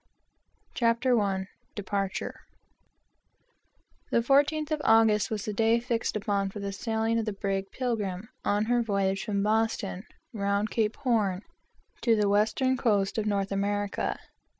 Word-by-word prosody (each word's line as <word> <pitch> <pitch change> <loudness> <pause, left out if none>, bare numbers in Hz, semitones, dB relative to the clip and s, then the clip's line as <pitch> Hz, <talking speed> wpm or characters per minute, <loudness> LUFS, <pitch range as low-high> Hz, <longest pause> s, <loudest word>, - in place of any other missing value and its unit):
CHAPTER 235 +1 +2
I 190 -2 -1 0.3
DEPARTURE 195 -1 -2 1.8
The 235 - +2
fourteenth 290 +4 +2
of 305 -1 0
August 220 -2 +4
was 215 -2 -3
the 210 - -3
day 225 +2 +3
fixed 235 -2 -2
upon 200 -2 0
for 205 - -8
the 200 0 -3
sailing 225 +2 0
of 225 - -2
the 215 - -2
brig 195 0 -2
Pilgrim 215 -6 -2 0.2
on 205 +1 +1
her 240 +1 +2
voyage 195 -3 0
from 200 -1 -1
Boston 215 -2 0 0.3
round 200 0 0
Cape 220 -1 0
Horn 215 -8 0 0.6
to 230 -2 +4
the 210 -1 +2
western 220 +6 +2
coast 210 -4 +1
of 215 - -1
North 200 -1 0
America. 205 0 -1
210 Hz, 140 wpm, -28 LUFS, 200-230 Hz, 1.8 s, August